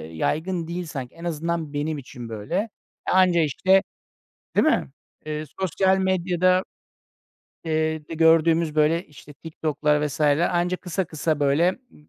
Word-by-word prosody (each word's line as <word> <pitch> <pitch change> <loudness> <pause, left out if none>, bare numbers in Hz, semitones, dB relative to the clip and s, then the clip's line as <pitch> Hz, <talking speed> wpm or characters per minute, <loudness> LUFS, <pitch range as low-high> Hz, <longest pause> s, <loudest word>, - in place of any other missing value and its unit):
yaygın 165 - -1
değil 175 +1 -4
sanki. 135 -5 -7
En 165 - -12
azından 165 -2 -3
benim 150 +2 -2
için 125 -3 -9
böyle. 110 +8 -5
Eee, 210 +4 0 0.4
anca 180 -2 +4
işte, 185 +6 +3 0.7
değil - - +4
mi, 310 - +2 0.4
eee, 155 0 -3 0.2
sosyal 190 +1 +2
medyada, 185 0 +2 1.0
eee, 155 -1 -1
de - - -5
gördüğümüz 160 0 +4
böyle, 155 +3 +2
işte, 150 0 -14
TikTok'lar 150 0 -1
vs. 145 +1 -7
Anca 175 +4 +2
kısa 180 +1 -3
kısa 155 -1 -2
böyle, 145 +5 +3 0.2
ımm, 150 - -21
160 Hz, 140 wpm, -24 LUFS, 150-180 Hz, 1.0 s, anca